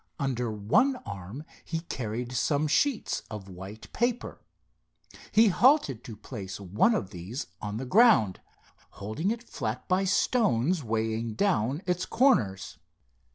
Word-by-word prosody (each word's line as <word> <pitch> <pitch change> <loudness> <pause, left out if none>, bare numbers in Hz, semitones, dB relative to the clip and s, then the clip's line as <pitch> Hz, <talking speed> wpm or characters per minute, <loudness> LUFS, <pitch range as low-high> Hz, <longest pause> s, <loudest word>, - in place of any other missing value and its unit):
Under 125 -4 -1
one 110 - +2
arm 100 +8 -7 0.2
he 165 -1 -3
carried 120 -6 -4
some 145 +5 +1
sheets 265 - +1
of 105 -3 -7
white 95 +3 -10
paper. 240 +1 -1 0.9
He 220 0 +6
halted 215 - +3
to 115 - -8
place 100 -4 -7
one 100 - +2
of 100 - -3
these 95 +8 -6 0.2
on 105 0 -4
the 130 - -4
ground, 200 - +5 0.6
holding 110 - -2
it 230 +2 -3
flat 115 - -5
by 185 +1 +2
stones 180 - +2
weighing 110 0 -2
down 145 - +1
its 180 0 -1
corners. 100 - +1
125 Hz, 130 wpm, -28 LUFS, -, 0.9 s, He